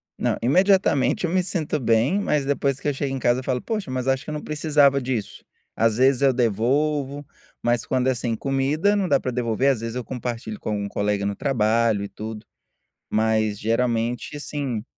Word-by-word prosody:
Não, - - 0
imediatamente, 185 - +3
eu 170 - -2
me 185 0 +2
sinto 155 -5 -2
bem, 115 - +2
mas 150 -8 0
depois 140 -1 0
que - - -4
eu 145 - +1
chego 135 0 -3
em 135 - -3
casa, 120 0 +2
eu - - -7
falo: 125 -2 -1
"Poxa, 215 - -3
mas 130 0 -3
acho 135 0 +1
que - - -9
eu - - -3
não 150 - -5
precisava 145 -2 +3
disso", 125 -5 -4 0.3
às 115 -1 +2
vezes 130 +1 +3
eu 135 - +6
devolvo, 135 +5 0 0.4
mas 120 -1 0
quando 130 0 0
é, - - +4
assim, 120 -2 -2
comida, 140 - +1
não 195 -3 0
dá 140 - +4
para 130 - -3
devolver, 120 +1 0
às 120 -5 0
vezes, 115 +1 -5
eu 125 - -3
compartilho 120 -4 -5
com - - -5
algum 100 -1 -2
colega 100 0 -1
no 100 - -1
trabalho 115 -4 +1
e 100 - -6
tudo, 110 0 -7 0.6
mas 110 -1 +1
geralmente, 115 +2 -1
assim 140 -6 -4
130 Hz, 200 wpm, -23 LUFS, 115-145 Hz, 0.6 s, eu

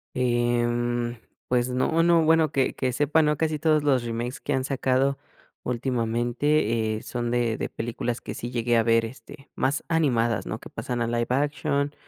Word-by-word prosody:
Em, 120 -1 0 0.3
pues 125 0 +1
no, 130 +6 +1
no, 170 -1 +4
bueno 160 -1 +3
que 135 -4 +1
que 130 -1 -1
sepa 150 +4 +3
no 150 -1 +2
casi 155 -2 -1
todos 155 -1 +2
los 135 -4 +2
remakes 120 +2 -4
que 145 - -2
han 130 0 0
sacado 135 0 +1 0.4
últimamente, 120 -1 0
eh, - - -8
son 120 -1 -3
de 120 -2 0
de - - -3
películas 120 +1 -3
que - - -7
sí 120 - -5
llegué 120 -1 0
a - - +5
ver, 115 0 +3
este, 135 +3 -12
más 135 +3 0
animadas, 120 - +1
¿no?, - - -3
que - - -11
pasan 120 -1 -4
a - - -1
live 120 0 -1
action 145 +1 0
125 Hz, 180 wpm, -25 LUFS, 120-145 Hz, 0.4 s, a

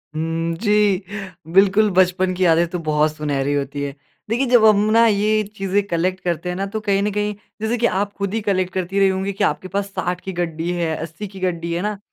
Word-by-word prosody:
हुँ, 165 +1 -1
जी। 205 -1 +2 0.5
बिल्कुल 200 +3 +5
बचपन 185 0 +2
की 185 - 0
यादें 170 0 +4
तो 180 0 -3
बहुत 150 0 +2
सुनहरी 145 -2 -1
होती 140 0 -2
है। 140 -1 -4 0.3
देखिए 240 +4 +1
जब 240 -2 +5
हम 215 -1 +7 0.2
ना 230 +1 +6
ये 215 0 +2
चीज़ें 195 +1 +1
कलेक्ट 185 +2 0
करते 175 0 -2
हैं 180 - -2
ना 195 - -2
तो 220 - -1
कहीं 200 -2 +1
न 210 - 0
कहीं 210 +1 -1 0.3
जैसे 225 +2 0
कि 235 - +1
आप 200 -2 0
खुद 200 0 -2
ही 225 - -1
कलेक्ट 185 -3 0
करती 190 +1 -1
रही 195 - +5
होंगी 190 +1 -2
कि 195 - -2
आपके 185 - 0
पास 195 +2 -2
60 180 -1 -3
की 190 - -5
गड्डी 170 -1 -3
है, 170 -2 -1
80 165 +6 -6
की 195 0 -11
गड्डी 170 -2 -2
है, - - -1
है 175 - -1
ना। 210 0 -2
185 Hz, 235 wpm, -20 LUFS, 170-205 Hz, 0.5 s, हम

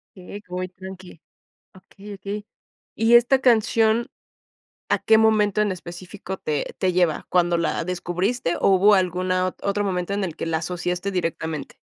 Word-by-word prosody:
Eh, 190 +2 -10
que - - -36
voy 185 0 -2
tranqui. 185 -2 -11 0.6
Okey, 195 +2 -12
okey. 205 +2 -6 0.5
Y 225 +2 +3
esta 245 +3 +5
canción, 225 -1 +3 0.8
¿a - - +2
qué 220 - +4
momento 215 -2 +3
en 210 -1 +2
específico 185 +2 -7
te 150 -2 -3
te 185 -1 +1
lleva, 175 -3 +1
cuándo 175 -1 +2
la 165 0 -1
descubriste 180 +3 -2
o - - +3
hubo 195 +2 +5
alguna 185 0 +1
ot 185 - -5
otro 200 +1 0
momento 180 0 -2
en 200 -1 -1
el 165 -4 -4
que - - -4
la 160 -1 0
asociaste 180 +3 -3
directamente? 160 -3 -3
185 Hz, 160 wpm, -23 LUFS, 180-205 Hz, 0.8 s, esta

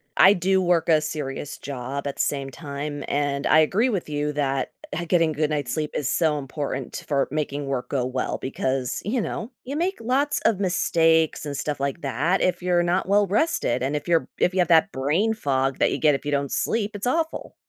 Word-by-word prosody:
I 190 - +8
do 190 +1 +2
work 175 -2 +2
a 155 -2 +4
serious 150 -2 -4
job, 140 +1 -5
at 140 - -3
the - - -1
same 140 -2 -1
time, 145 0 -6
and 140 -1 -1
I 155 - +5
agree 210 +11 +3
with 195 -6 -2
you 150 0 -1
that, 135 -2 -1 0.3
uh, 175 - -2
getting 165 -2 +2
good 150 0 0
night's 145 -3 -2
sleep 155 -2 -2
is 140 - -1
so 155 -3 +2
important 140 +1 -5
for 140 -2 +1
making 145 -2 -2
work 130 -2 -3
go 130 -3 0
well, 130 0 -2
because, 130 -1 -2
you 235 +5 0
know, 225 +3 -4
you 275 - -4
make 370 +4 0
lots 275 +5 +1
of 200 -4 +3
mistakes 165 -4 +2
and 145 - -4
stuff 145 0 -3
like 140 +4 -2
that 145 +8 0
if 180 - +1
you're 175 -1 +2
not 175 +2 0
well-rested, 205 - +2
and 140 +3 -1
if 145 - -8
you're 170 -1 +4
b - - -16
if 180 - +2
you 190 - 0
have 175 - +3
that 170 +4 +5
brain 155 +12 +1
fog 135 -9 0
that - - +3
you - - -1
get 150 -3 +4
if 135 - -6
you 145 - -1
don't 140 -1 -1
sleep, 215 -2 0
it's 205 +4 -3
awful. 320 +5 -1
150 Hz, 215 wpm, -24 LUFS, 140-185 Hz, 0.3 s, I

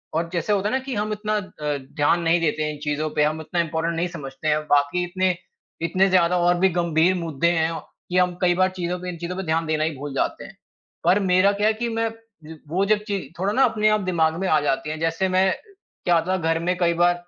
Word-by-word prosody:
और 165 +1 -1
जैसे 170 +5 0
होता 200 0 +1
है - - -3
ना - - +1
कि 260 -4 -4
हम 210 +1 -1
इतना 215 0 -2
अ, 150 -7 -4 0.2
ध्यान 150 +4 +2
नहीं 165 +1 +3
देते 155 -1 0
इन 150 - -8
चीज़ों 150 +1 -1
पे 150 - +5
हम 155 +1 0
इतना 170 +2 -3
इम्पॉर्टन्ट 165 +1 -2
नहीं 170 +2 0
समझते 145 -3 -7
हैं 155 0 +2
बाकी 145 +5 +2
इतने 185 0 0 0.5
इतने 190 +3 +3
ज़्यादा 180 -1 +3
और 175 0 +3
भी 190 - +4
गंभीर 170 +2 +2
मुद्दे 170 -2 -1
हैं 160 -1 +1
औ 165 - -5 0.3
कि 180 - 0
हम 180 -1 +3
कई 180 -1 +4
बार 185 +1 +3
चीज़ों 180 -1 -3
पे 180 0 -5
इन 175 - -6
चीज़ों 175 +2 -5
पे 190 - -4
ध्यान 165 -1 0
देना 155 -1 0
ही 160 - 0
भूल 145 0 -6
जाते - - -1
हैं। - - -13 0.5
पर 190 - +4
मेरा 190 0 +4
क्या 210 - +3
है 220 - +3
कि 235 +2 -3
मैं 225 0 0 0.6
वो 185 +5 +1
जब 210 0 +3
ची 200 -1 -1 0.2
थोड़ा 195 +3 0
ना 270 - +4
अपने 215 -3 +2
आप 215 0 +2
दिमाग 165 -4 +1
में 190 - 0
आ 155 - +4
जाती 135 0 -1
है। 155 - -3
जैसे 165 +3 0
मैं 185 +1 +3 0.6
क्या 175 - +4
होता 170 +3 +1
घर 165 -1 0
में 180 +2 0
कई 170 -1 +2
बार 175 +1 +3
175 Hz, 250 wpm, -23 LUFS, 160-190 Hz, 0.6 s, पे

